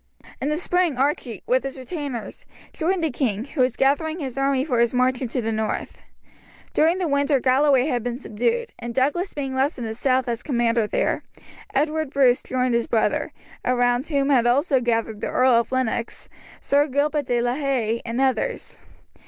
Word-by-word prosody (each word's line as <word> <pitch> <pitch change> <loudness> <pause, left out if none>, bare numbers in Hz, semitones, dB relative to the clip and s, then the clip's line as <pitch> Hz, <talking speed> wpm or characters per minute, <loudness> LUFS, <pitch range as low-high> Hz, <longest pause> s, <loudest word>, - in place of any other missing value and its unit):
In 275 - 0
the 300 - 0
spring 355 -4 +1
Archie, 265 - -1
with 255 +1 +2
his 270 0 -5
retainers, 260 -3 -6 0.3
joined 350 +1 -1
the 320 - +1
king, 230 -5 -1
who 280 -1 -3
was 250 -1 +2
gathering 310 +4 +1
his 270 -7 -5
army 275 -1 +1
for 250 -6 0
his 235 +1 +2
march 255 0 +2
into 250 0 -2
the 225 - -1
north. 220 -1 -3 0.7
During 330 +4 +3
the 365 -2 -1
winter 280 -1 +2
Galloway 265 +1 +3
had 250 -5 0
been 240 +1 -3
subdued, 375 - -2
and 235 -1 -6
Douglas 295 +8 0
being 270 -2 -3
left 270 +3 0
in 245 - -5
the 220 -1 -3
south 255 +2 +1
as 235 -1 -2
commander 235 -5 +1
there, - - 0 0.5
Edward 310 +1 0
Bruce 260 -3 +3
joined 255 -1 -1
his 235 0 +1
brother, 225 - 0 0.3
around 245 +1 +1
whom 280 -2 +1
also 265 +3 +3
gathered 225 -3 -1
the - - -1
Earl 255 +1 +3
of 235 0 +2
Lennox, 240 -2 -2 0.3
Sir 285 +1 +2
Gilbert 290 0 0
de 240 -1 +1
la 240 +1 0
Haye, 255 -5 -1
and 235 +1 -3
others. 270 - -1
260 Hz, 180 wpm, -23 LUFS, 240-285 Hz, 0.7 s, During